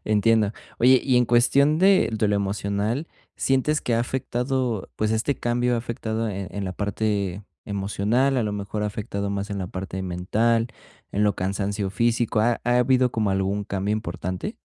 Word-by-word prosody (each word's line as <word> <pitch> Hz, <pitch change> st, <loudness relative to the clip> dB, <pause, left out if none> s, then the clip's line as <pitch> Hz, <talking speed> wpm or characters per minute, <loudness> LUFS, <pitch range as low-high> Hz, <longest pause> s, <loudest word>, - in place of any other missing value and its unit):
Entiendo. 110 Hz, 0 st, +3 dB, 0.3 s
Oye, 130 Hz, +2 st, +6 dB
y 130 Hz, -2 st, +2 dB
en 125 Hz, -, +5 dB
cuestión 140 Hz, +6 st, +4 dB
de 190 Hz, -, +5 dB
de 110 Hz, -1 st, +1 dB
lo 105 Hz, -, +2 dB
emocional, 100 Hz, +7 st, -1 dB, 0.3 s
¿sientes 135 Hz, +3 st, +1 dB
que 120 Hz, -, 0 dB
ha 115 Hz, -, +2 dB
afectado, 125 Hz, -2 st, -2 dB
pues, 110 Hz, 0 st, 0 dB
este 110 Hz, +6 st, +1 dB
cambio 120 Hz, +1 st, 0 dB
ha -, -, 0 dB
afectado, 115 Hz, -1 st, -3 dB
eh, 95 Hz, -2 st, -4 dB
en 100 Hz, -1 st, -4 dB
la 95 Hz, -, -3 dB
parte 100 Hz, -1 st, -2 dB, 0.2 s
emocional, 105 Hz, +7 st, 0 dB
a 120 Hz, -, +2 dB
lo 105 Hz, -1 st, -2 dB
mejor 105 Hz, +1 st, -4 dB
ha 105 Hz, -, +1 dB
afectado 100 Hz, -1 st, -3 dB
más 100 Hz, +1 st, -3 dB
en 100 Hz, -, -3 dB
la 95 Hz, -, -3 dB
parte 95 Hz, +1 st, -5 dB
mental, 110 Hz, +6 st, +1 dB, 0.4 s
en 105 Hz, +1 st, +1 dB
lo 105 Hz, -, +2 dB
cansancio 100 Hz, +1 st, -2 dB
físico, 115 Hz, 0 st, +1 dB
ha 115 Hz, +1 st, +2 dB
ha 120 Hz, 0 st, +3 dB
habido 130 Hz, 0 st, +3 dB
como 105 Hz, -3 st, 0 dB
algún 95 Hz, +1 st, 0 dB
cambio 100 Hz, +2 st, -2 dB
importante? 90 Hz, -3 st, -4 dB
110 Hz, 180 wpm, -24 LUFS, 100-120 Hz, 0.4 s, Oye